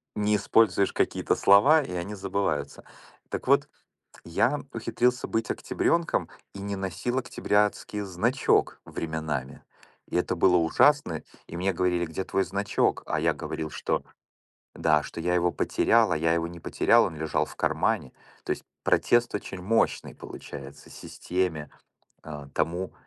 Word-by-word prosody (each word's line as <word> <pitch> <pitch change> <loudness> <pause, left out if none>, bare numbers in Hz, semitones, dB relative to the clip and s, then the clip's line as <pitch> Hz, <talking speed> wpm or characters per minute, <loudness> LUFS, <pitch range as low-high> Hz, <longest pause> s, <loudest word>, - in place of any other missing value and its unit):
не 105 0 +2
используешь 105 -1 +3
какие-то - - 0
слова- 125 +11 +6
и 90 - -7
они 90 +4 -4
забываются. 95 -8 -2 0.5
Так - - -5
вот, - - +3 0.6
я - - +1
ухитрился 125 +1 0
быть 110 0 -1
октябрёнком 170 0 0 0.3
и 100 - -7
не 100 0 -4
носил 95 +7 -2
октябрятский 105 -3 0
значок 105 +8 +1
временами. 80 -5 -4 0.5
И - - -2
это - - 0
было 90 -1 +4
ужасно, 85 - +3 0.2
и 85 - -8
мне 95 +2 0
говорили: 90 -1 0
"Где 80 +4 -4
твой 95 - 0
значок?" 100 +2 0
А - - -1
я - - +2
говорил, 80 -1 -5
что - - -2 0.7
да, 75 -2 +2
что 85 - -7
я 90 +1 0
его 90 0 +2
потерял, 115 -6 +2
а - - +2
я 80 +1 +2
его 85 0 0
не 85 -1 -10
потерял, - - +3
он 80 - -4
лежал 80 0 0
в - - -13
кармане. 65 - 0 0.3
То - - -6
есть - - -6 0.2
протест 120 -1 +3
очень 95 -2 -5
мощный, 115 +4 0
получается, 70 0 -10
системе, 85 -5 -3 0.5
э, 75 -2 -8
тому, 90 +3 -1
90 Hz, 145 wpm, -27 LUFS, 80-105 Hz, 0.7 s, слова